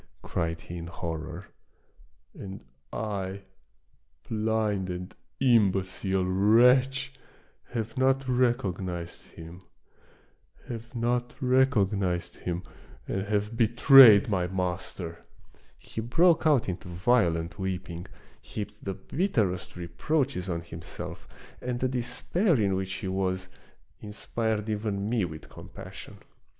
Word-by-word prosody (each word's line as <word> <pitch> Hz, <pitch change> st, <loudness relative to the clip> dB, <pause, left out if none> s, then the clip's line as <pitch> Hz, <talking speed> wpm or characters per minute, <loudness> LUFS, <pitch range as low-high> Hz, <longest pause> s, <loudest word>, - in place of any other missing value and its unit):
" -, -, -41 dB
cried 80 Hz, 0 st, -2 dB
he 85 Hz, -, -8 dB
in 85 Hz, 0 st, -6 dB
horror; 85 Hz, -2 st, -6 dB, 0.8 s
"and 95 Hz, -8 st, -9 dB, 0.3 s
I, 100 Hz, -3 st, -4 dB, 0.8 s
blind 110 Hz, -3 st, 0 dB
and 90 Hz, +1 st, -5 dB, 0.3 s
imbecile 95 Hz, -5 st, +2 dB
wretch, 125 Hz, +8 st, +4 dB, 0.5 s
have 115 Hz, -2 st, -4 dB
not 135 Hz, 0 st, +2 dB
recognized 95 Hz, -9 st, -1 dB
him, 85 Hz, +2 st, -11 dB, 1.1 s
have 120 Hz, +1 st, -7 dB
not 120 Hz, +1 st, 0 dB
recognized 100 Hz, -10 st, +1 dB
him, 90 Hz, 0 st, -3 dB, 0.4 s
and 95 Hz, +1 st, -2 dB
have 105 Hz, +2 st, -1 dB
betrayed 120 Hz, -1 st, +8 dB
my 90 Hz, -5 st, 0 dB
master 90 Hz, -2 st, -3 dB, 0.3 s
I -, -, -28 dB
" -, -, -35 dB
He 110 Hz, -, -6 dB
broke 160 Hz, +8 st, +4 dB
out 145 Hz, -6 st, +3 dB
into 90 Hz, 0 st, -4 dB
violent 90 Hz, -3 st, +1 dB
weeping; 90 Hz, -2 st, -4 dB, 0.3 s
heaped 105 Hz, 0 st, -7 dB
the 95 Hz, -1 st, -3 dB
bitterest 105 Hz, -, -1 dB
reproaches 115 Hz, -, -1 dB
on 85 Hz, -1 st, -2 dB
himself, 85 Hz, 0 st, -8 dB, 0.3 s
and 125 Hz, -1 st, -2 dB
the 130 Hz, -, +1 dB
despair 130 Hz, -, 0 dB
in 100 Hz, -2 st, +2 dB
which 95 Hz, 0 st, -2 dB
he 95 Hz, +1 st, -4 dB
was, 95 Hz, 0 st, -1 dB, 0.5 s
inspired 110 Hz, +1 st, -2 dB
even 105 Hz, -2 st, -2 dB
me 110 Hz, -4 st, +1 dB
with 80 Hz, -2 st, -8 dB
com -, -, -12 dB
passion. -, -, -10 dB
100 Hz, 115 wpm, -28 LUFS, 90-120 Hz, 1.1 s, betrayed